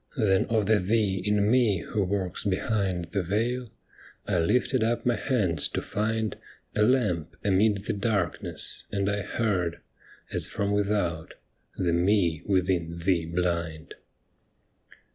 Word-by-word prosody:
Then 100 Hz, -5 st, +3 dB
of 110 Hz, -3 st, +1 dB
the 110 Hz, +1 st, +4 dB
Thee 100 Hz, -1 st, +1 dB
in 105 Hz, +1 st, +2 dB
Me 115 Hz, -8 st, +3 dB
ivho 100 Hz, -3 st, -1 dB
works 95 Hz, -1 st, -2 dB
behind 95 Hz, -3 st, 0 dB
The 100 Hz, -, 0 dB
Veil, 115 Hz, +7 st, -1 dB, 0.6 s
I 90 Hz, -, +1 dB
lifted 120 Hz, +7 st, +2 dB
up 115 Hz, +1 st, 0 dB
my 120 Hz, -1 st, +3 dB
hands 100 Hz, -, +1 dB
to -, -, -3 dB
find 110 Hz, 0 st, -2 dB, 0.4 s
A -, -, +2 dB
lamp 105 Hz, -, +2 dB
amid 100 Hz, 0 st, +2 dB
the -, -, 0 dB
Darkness, 100 Hz, -4 st, -2 dB
and 100 Hz, -1 st, 0 dB
I 100 Hz, 0 st, 0 dB
heard. 95 Hz, -5 st, -1 dB, 0.5 s
As -, -, 0 dB
from 100 Hz, 0 st, -2 dB
ivithout 100 Hz, -6 st, 0 dB, 0.2 s
— -, -, -45 dB
' -, -, -34 dB
The 85 Hz, -, +2 dB
Me 85 Hz, -3 st, +2 dB
within 90 Hz, -3 st, +1 dB
Thee 85 Hz, -1 st, +1 dB
Blind 85 Hz, -2 st, -2 dB
100 Hz, 145 wpm, -27 LUFS, 90-110 Hz, 0.6 s, the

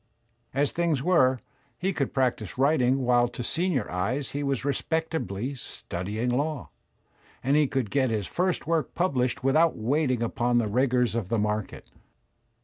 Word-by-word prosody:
As 140 Hz, +1 st, +1 dB
things 165 Hz, -6 st, 0 dB
were, 130 Hz, -8 st, +3 dB, 0.4 s
he 190 Hz, +1 st, -1 dB
could 140 Hz, -6 st, -1 dB
practise 125 Hz, -5 st, -1 dB
writing 135 Hz, -2 st, +3 dB
while 120 Hz, 0 st, +4 dB
to 120 Hz, 0 st, -6 dB
senior 160 Hz, -, 0 dB
eyes 115 Hz, +9 st, -2 dB
he 145 Hz, -, -3 dB
was 140 Hz, -2 st, -1 dB
respectably 140 Hz, -, -2 dB
studying 110 Hz, -2 st, -4 dB
law; 145 Hz, +2 st, -2 dB, 0.7 s
and 135 Hz, +3 st, +2 dB
he 150 Hz, -1 st, +4 dB
could 130 Hz, -6 st, -2 dB
get 135 Hz, -3 st, +2 dB
his 110 Hz, -3 st, -1 dB
first 180 Hz, -, -1 dB
work 160 Hz, -4 st, -1 dB
published 130 Hz, -9 st, 0 dB
with 135 Hz, 0 st, +2 dB
out 165 Hz, +1 st, +4 dB
waiting 130 Hz, +1 st, +1 dB
upon 120 Hz, +1 st, +1 dB
the 115 Hz, -2 st, +2 dB
rigours 125 Hz, +2 st, +2 dB
of 115 Hz, -5 st, -2 dB
the 115 Hz, -, +1 dB
market. 105 Hz, -1 st, -3 dB
130 Hz, 155 wpm, -27 LUFS, 120-150 Hz, 0.7 s, while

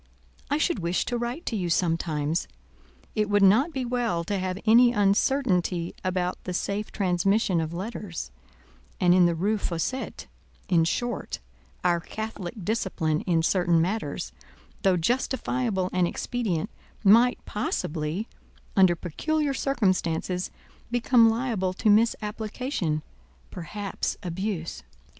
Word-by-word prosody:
I 290 Hz, -, +2 dB
should 315 Hz, -, +1 dB
wish 170 Hz, +1 st, 0 dB
to 245 Hz, -, -2 dB
write 240 Hz, +8 st, -3 dB
to 230 Hz, -, -2 dB
you 180 Hz, -4 st, -1 dB
sometimes: 165 Hz, -2 st, 0 dB, 0.7 s
it 210 Hz, -1 st, 0 dB
would 205 Hz, -1 st, +4 dB
not 225 Hz, -, +5 dB
be 265 Hz, -4 st, -3 dB
well 235 Hz, -8 st, 0 dB
to 200 Hz, +3 st, -2 dB
have 185 Hz, 0 st, -2 dB
any 240 Hz, +2 st, +7 dB
uncertainty 195 Hz, -5 st, +1 dB
about 185 Hz, -1 st, -1 dB
the 180 Hz, -, -3 dB
safe 200 Hz, +3 st, -2 dB
transmission 190 Hz, -1 st, +1 dB
of 160 Hz, 0 st, -3 dB
letters; 185 Hz, -, -5 dB, 0.7 s
and 175 Hz, -1 st, +5 dB
in 180 Hz, -1 st, +6 dB
the 170 Hz, -, 0 dB
Rue 205 Hz, +6 st, 0 dB
Fossette—in 175 Hz, -3 st, -2 dB
short, 240 Hz, +6 st, -2 dB, 0.5 s
our 175 Hz, -1 st, +3 dB
Catholic 210 Hz, 0 st, -6 dB
discipline 185 Hz, -8 st, 0 dB
in 165 Hz, -2 st, +2 dB
certain 175 Hz, -1 st, +3 dB
matters—though 160 Hz, -, -2 dB
justifiable 235 Hz, -1 st, 0 dB
and 180 Hz, -1 st, +3 dB
expedient—might 225 Hz, +3 st, +1 dB
possibly, 170 Hz, -1 st, -2 dB, 0.5 s
under 185 Hz, -3 st, +5 dB
peculiar 290 Hz, -, -1 dB
circumstances, 185 Hz, -9 st, 0 dB, 0.4 s
become 240 Hz, -1 st, +5 dB
liable 225 Hz, -6 st, -1 dB
to 210 Hz, +3 st, +2 dB
misapplication—perhaps 210 Hz, -, -2 dB
abuse." 180 Hz, -1 st, -3 dB
195 Hz, 110 wpm, -26 LUFS, 175-230 Hz, 0.7 s, any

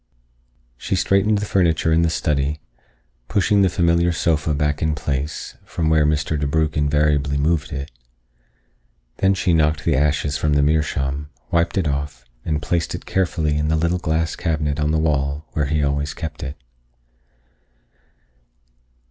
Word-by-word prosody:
She 95 Hz, -, -2 dB
straightened 100 Hz, +5 st, +2 dB
the 105 Hz, -, -2 dB
furniture 85 Hz, -5 st, +2 dB
in 80 Hz, -, +4 dB
the 85 Hz, -, +2 dB
study, 75 Hz, -2 st, -1 dB, 0.7 s
pushing 100 Hz, 0 st, +2 dB
the 95 Hz, -, +4 dB
familiar 85 Hz, 0 st, +2 dB
sofa 80 Hz, -3 st, 0 dB
back 75 Hz, 0 st, -1 dB
in 80 Hz, -1 st, +1 dB
place, 75 Hz, +1 st, -4 dB
from 80 Hz, -1 st, -2 dB
where 75 Hz, -2 st, +4 dB
Mr. 75 Hz, 0 st, 0 dB
DeBrugh 75 Hz, +1 st, 0 dB
invariably 75 Hz, -1 st, +1 dB
moved 75 Hz, +1 st, 0 dB
it. 70 Hz, -1 st, -5 dB, 1.3 s
Then 95 Hz, 0 st, +3 dB
she 90 Hz, -2 st, +1 dB
knocked 75 Hz, -1 st, +2 dB
the -, -, +2 dB
ashes 75 Hz, +1 st, +1 dB
from 75 Hz, -1 st, +1 dB
the 70 Hz, 0 st, +3 dB
meerschaum, 75 Hz, -2 st, 0 dB, 0.2 s
wiped 85 Hz, +2 st, +1 dB
it 90 Hz, -5 st, +1 dB
off, 70 Hz, -3 st, -3 dB, 0.2 s
and 75 Hz, -1 st, -2 dB
placed 85 Hz, -2 st, -1 dB
it -, -, -8 dB
carefully 80 Hz, -5 st, 0 dB
in 75 Hz, -, 0 dB
the 80 Hz, -, +2 dB
little 85 Hz, +3 st, +1 dB
glass 80 Hz, -1 st, -1 dB
cabinet 75 Hz, -3 st, -1 dB
on 75 Hz, 0 st, +1 dB
the 80 Hz, -, +2 dB
wall 75 Hz, -1 st, 0 dB
where 75 Hz, -, 0 dB
he 75 Hz, +2 st, 0 dB
always 70 Hz, +1 st, -1 dB
kept 80 Hz, -2 st, -6 dB
it. 70 Hz, +3 st, -6 dB
75 Hz, 155 wpm, -21 LUFS, 75-80 Hz, 1.3 s, in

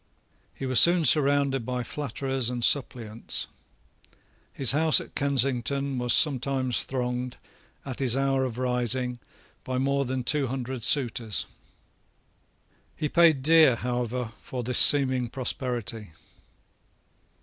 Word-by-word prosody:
He 135 Hz, -, -7 dB
was 130 Hz, -2 st, +4 dB
soon 170 Hz, -1 st, +6 dB
surrounded 140 Hz, -2 st, +2 dB
by 125 Hz, +1 st, -4 dB
flatterers 135 Hz, -1 st, -4 dB
and 120 Hz, -1 st, -5 dB
suppliants. 115 Hz, -5 st, -3 dB, 1.1 s
His 135 Hz, -4 st, +4 dB
house 155 Hz, +2 st, +3 dB
at -, -, -12 dB
Kensington 140 Hz, 0 st, -1 dB
was 120 Hz, 0 st, -1 dB
sometimes 130 Hz, -2 st, +2 dB
thronged, 125 Hz, -1 st, -5 dB, 0.5 s
at 130 Hz, -3 st, -7 dB
his 130 Hz, -2 st, +1 dB
hour 135 Hz, -1 st, 0 dB
of 125 Hz, -3 st, -5 dB
rising, 125 Hz, 0 st, -2 dB, 0.4 s
by 130 Hz, 0 st, -4 dB
more 140 Hz, +1 st, -1 dB
than 130 Hz, 0 st, -4 dB
two 140 Hz, +1 st, +1 dB
hundred 130 Hz, -1 st, -6 dB
suitors. 115 Hz, -, 0 dB, 1.5 s
He 150 Hz, -2 st, -4 dB
paid 160 Hz, -5 st, +3 dB
dear, 160 Hz, -4 st, +4 dB
however, 120 Hz, -1 st, -4 dB
for 125 Hz, -2 st, -7 dB
this 125 Hz, +1 st, 0 dB
seeming 130 Hz, -4 st, +5 dB
prosperity. 120 Hz, -, -4 dB
130 Hz, 115 wpm, -25 LUFS, 125-140 Hz, 1.5 s, soon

